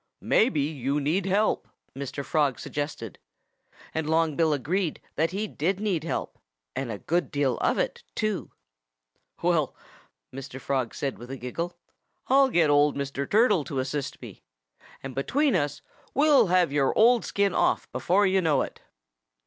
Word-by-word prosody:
"Maybe 215 - +3
you 140 -1 -1
need 170 +7 0
help," 205 +3 +1 0.3
Mr. 140 0 -5
Frog 145 -5 +1
suggested. 145 - -5 0.7
And 160 -1 -2
Long 160 -1 +2
Bill 160 0 +2
agreed 160 +5 -1 0.2
that 160 +2 +1
he 200 +4 -2
did 190 0 -1
need 195 -7 -1
help 165 - -4 0.4
and 130 -4 -3
a 105 - -4
good 175 - -1
deal 140 -3 0
of - - +1
it, - - -2
too. 215 -3 -2 0.9
"Well," 170 -5 +1 0.6
Mr. 135 0 -7
Frog 130 -3 -2
said 140 -2 -3
with 120 +1 -10
a 135 - -5
giggle, 165 +8 -5 0.5
"I'll 270 0 +5
get 165 - +3
old 145 0 +4
Mr. 140 0 -3
Turtle 210 -6 +4
to 145 - -5
assist 135 +1 -3
me. - - -10 0.6
And 135 -1 -6
between 265 - +1
us 145 -3 -1 0.3
we'll 290 -5 +5
have 180 -3 +3
your 140 -2 +1
old 235 +1 +5
skin 200 -2 0
off - - +1
before 195 +4 +2
you 190 0 +3
know 155 -5 +2
it." - - -9
155 Hz, 155 wpm, -26 LUFS, 140-195 Hz, 0.9 s, I'll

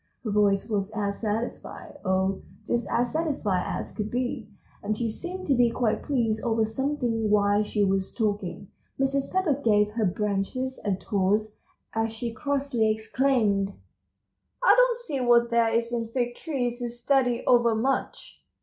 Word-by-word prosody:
Her 220 - -2
voice 205 -1 +2
was 205 -3 -1
as 200 -1 -2
satisfied, 225 +6 -4
oh, 190 0 0 0.2
just 235 -3 -1
as 245 0 +1
satisfied 280 - 0
as - - -4
could 210 0 -4
be, 245 -3 -3 0.3
and 210 +1 -2
she 230 -1 -1
seemed 370 +8 -6
to 280 - +2
be 245 -2 +4
quite 230 -2 0
pleased 230 -6 0
over 225 -2 +2
something 235 -2 -1
while 205 0 +3
she 210 0 0
was 195 -1 0
talking. 205 -4 -2 0.3
Mrs. 270 0 0
Pepper 375 -5 +2
gave 210 -2 +3
her 220 0 0
branches 210 +7 -2
a 200 -3 +1
toss, 210 +2 0 0.4
as 225 0 0
she 230 +1 -5
crossly 270 -3 0
exclaimed: 215 -3 +1 0.9
"I - - +7
don't - - +4
see 315 - -4
what 240 -1 +4
there 235 -1 +3
is 230 +1 0
in 230 -1 -1
Fig 240 +1 -1
Trees 245 -5 -3
to 240 -1 -3
study 245 0 +1
over 235 -2 +4
much! 265 +5 -2
230 Hz, 160 wpm, -26 LUFS, 210-255 Hz, 0.9 s, I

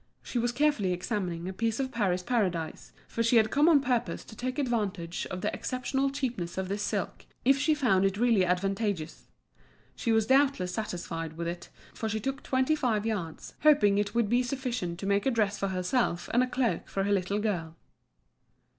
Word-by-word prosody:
She 245 - -2
was 240 +1 +1
carefully 245 -8 +2
examining 180 -3 -3
a 190 - -4
piece 225 +4 -1
of 265 -1 -1
Paris 190 -6 0
Paradise, 180 -9 -1 0.2
for 230 - -3
she 230 +1 +3
had 220 -1 +4
come 295 +4 +5
on 300 -4 +6
purpose 245 -3 -1
to 220 - -12
take 255 +4 -3
advantage 205 - -2
of 185 - -5
the - - -1
exceptional 265 +2 -1
cheapness 245 -12 -3
of 190 -1 -2
this 200 +1 -2
silk, - - -3 0.2
if 270 +2 +5
she 310 +2 +3
found 230 -10 +3
it 195 0 +1
really 230 -4 +4
advantageous. 185 -1 -1 0.7
She 230 - -1
was 220 -1 +3
doubtless 265 -9 +3
satisfied 170 -6 -4
with 170 0 -3
it, 175 +1 -5 0.2
for 220 - -3
she 220 0 -1
took 270 +5 -3
twenty 260 +3 +1
five 225 -7 0
yards, 185 -8 -4
hoping 210 -10 +5
it 205 +1 -2
would 235 -2 +3
be 240 +4 +3
sufficient 245 -9 -3
to - - -4
make 200 +4 +1
a - - +5
dress 215 -4 0
for 195 - 0
herself 185 +1 -1
and 245 - +5
a 255 - +2
cloak 250 -2 -1
for 195 - -2
her 200 - 0
little 200 0 +1
girl. 180 -7 -2
215 Hz, 195 wpm, -29 LUFS, 185-250 Hz, 0.7 s, on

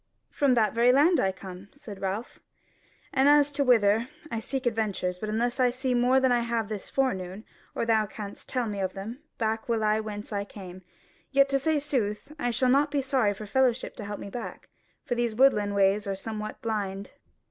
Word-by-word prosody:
"From 275 -3 +2
that 220 -3 +2
very 235 +2 +5
land 305 +7 +4
I 190 - +2
come," 185 +1 -10
said 215 -9 -10
Ralph, 195 +4 -4 0.7
"and 270 +1 +4
as 290 0 +5
to 285 0 +1
whither, 225 -2 +3 0.2
I 230 - -1
seek 260 +3 -4
adventures; 210 -6 -1
but 215 - -4
unless 240 +4 -1
I 250 -1 +5
see 255 +1 -2
more 250 +2 +4
than 260 -1 +2
I 245 - +4
have 230 -2 -1
this 210 -3 -6
forenoon, 195 -6 -2 0.3
or - - -1
thou 220 -2 +2
canst 205 -1 -8
tell 250 -2 0
me 205 -2 -4
of 190 -1 -1
them, 215 +6 -7 0.2
back 220 0 -2
will 225 -2 +1
I 215 0 +2
whence 210 0 -6
I 200 0 -1
came: 185 -3 -10 0.5
yet 275 0 +4
to 275 0 +2
say 315 +2 +1
sooth, 260 -3 -2
I 245 - 0
shall 250 +2 +1
not 280 +3 +4
be 280 -1 0
sorry 255 -7 +1
for 215 - -8
a - - -6
fellow 255 +3 +3
to 230 -2 -8
help 205 0 -5
me 200 - -8
back, 240 - -7 0.4
for 250 - -1
these 240 -2 -1
woodland 210 -6 +3
ways 200 +1 +3
are 195 - -1
some 215 +3 -5
what 215 0 -7
blind." 200 -3 -3
225 Hz, 215 wpm, -27 LUFS, 205-255 Hz, 0.7 s, very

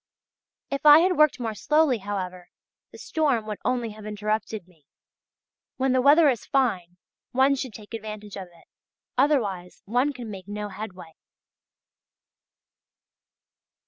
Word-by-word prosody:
If 275 - -3
I 300 0 +10
had 365 +1 +2
worked 305 -3 +4
more 225 -3 -3
slowly, 300 +2 +2
however, 185 -3 -5 0.4
the - - -12
storm 285 -9 0
would 210 -1 -5
only 240 -3 -1
have 215 0 -12
interrupted 215 -1 -3
me. 160 -6 -27 0.9
When 265 0 +1
the 255 0 +3
weather 295 +4 +6
is 250 -6 +1
fine 185 -10 0 0.4
one 265 +2 +4
should 260 -4 -4
take 215 0 -12
advantage 215 -2 -7
of 190 -2 -7
it, 175 -1 -22 0.5
otherwise 215 -11 0
one 250 +7 +1
can 245 -5 -8
make 190 -2 -9
no 210 0 -5
headway. 185 -5 -9
220 Hz, 135 wpm, -25 LUFS, 195-265 Hz, 0.9 s, I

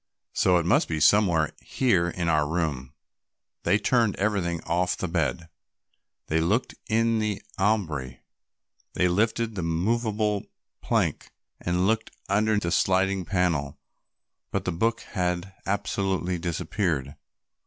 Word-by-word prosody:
So 90 -1 +4
it 85 - 0
must 90 - +3
be 80 -2 -2
somewhere 85 -2 +4
here 95 -10 +1
in 85 0 -3
our 75 -3 +2
room." 75 -6 -2 0.7
They 100 - +3
turned 115 0 +2
everything 95 -5 0
off 90 +2 0
the 95 - -2
bed, 80 -1 -1 0.8
they 80 - +1
looked 105 +10 +1
in 115 0 +2
the 105 -2 -1 0.2
ambry, 80 -11 0 0.7
they 90 - +2
lifted 110 +5 +1
the 95 - -3
movable 105 +4 0 0.4
plank - - 0 0.3
and 90 +1 0
looked 110 +2 +1 0.2
under 105 +2 +2
the 85 -4 -1
sliding 95 0 +2
panel, 85 -6 0 0.7
but - - -2
the 90 - 0
book 115 +7 0
had 90 -1 -2
absolutely 95 -2 -1
disappeared. 80 -4 -2
90 Hz, 125 wpm, -26 LUFS, 85-105 Hz, 0.8 s, So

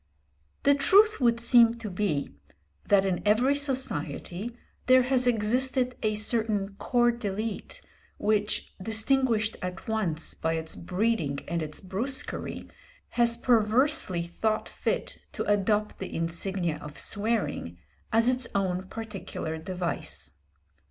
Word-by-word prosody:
The 285 - +5
truth 400 +8 +5
would 235 -1 +3
seem 235 -1 +5
to 225 -3 -7
be 180 - -2 0.5
that 195 -1 +4
in 185 -2 -1
every 225 +7 +3
society 235 - -2 0.3
there 255 0 +6
has 250 0 +2
existed 250 +3 +1
a 215 -1 0
certain 215 -2 +1
corps 240 -1 +2
d'élite, 215 -2 -5 0.4
which, 210 0 -1
distinguished 225 +1 +1
at 180 0 -6
once 185 -8 -1
by 160 0 -2
its 160 0 -3
breeding 180 -6 -1
and 170 -1 -2
its 155 -1 -4
brusquerie, 225 +9 -2 0.4
has 235 -1 +2
perversely 235 - +3
thought 215 +6 -2
fit - - -3
to - - -3
adopt 205 +1 0
the 190 - -6
insignia 170 0 -1
of 150 0 -9
swearing 200 - -1 0.3
as 230 +1 +4
its 255 -1 +3
own 185 -1 -1
particular 195 -7 -6
device. 170 - -3
215 Hz, 120 wpm, -27 LUFS, 180-240 Hz, 0.5 s, there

